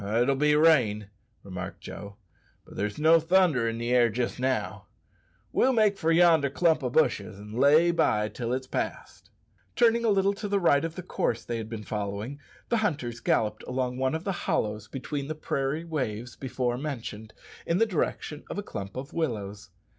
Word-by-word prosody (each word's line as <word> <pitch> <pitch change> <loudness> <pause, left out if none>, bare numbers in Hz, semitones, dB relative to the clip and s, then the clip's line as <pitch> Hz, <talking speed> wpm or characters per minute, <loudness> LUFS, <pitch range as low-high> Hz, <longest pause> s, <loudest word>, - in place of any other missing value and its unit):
"It'll 115 +6 +2
be 150 +2 +3
rain," 120 -11 +3 0.3
remarked 95 0 -7
Joe; 100 0 -9 0.5
"but - - -14
there's 105 0 -2
no 160 +2 +5
thunder 165 -8 +3
in 115 - -4
the 120 +1 -2
air 120 -1 +5
jist 120 +2 -2
now. 105 -6 -2 0.6
We'll 265 - +3
make 215 -3 +3
for 165 -4 0
yonder 165 -4 +5
clump 160 0 +2
o' 125 - 0
bushes 115 -8 +1
and 105 +1 -10
lay 145 +7 +5
by 105 -11 +2
till 120 +1 -4
it's 130 +1 -2
past." - - -5 0.5
Turning 235 -1 +4
a 230 - +3
little 200 -1 +3
to 205 +1 -5
the 200 0 +1
right 155 -5 +3
of 165 0 -4
the 185 - -6
course 120 -8 -1
they 120 - -3
had 110 -1 -6
been 110 -2 -6
following, 105 +6 -4 0.3
the 235 - +2
hunters 140 - -2
galloped 110 -1 0
along 125 -1 -2
one 130 +3 0
of 160 - -4
the 195 -3 -4
hollows 105 0 -1
between 140 +3 -5
the 155 - -4
prairie 150 +1 -2
waves 125 -7 -3
before 125 -2 -2
mentioned, 115 -7 -6 0.3
in 170 - +2
the 225 - +4
direction 155 -5 -3
of - - -5
a 205 - -2
clump 100 - -7
of 135 +3 -7
willows. 105 -10 -3
130 Hz, 185 wpm, -27 LUFS, 110-165 Hz, 0.6 s, no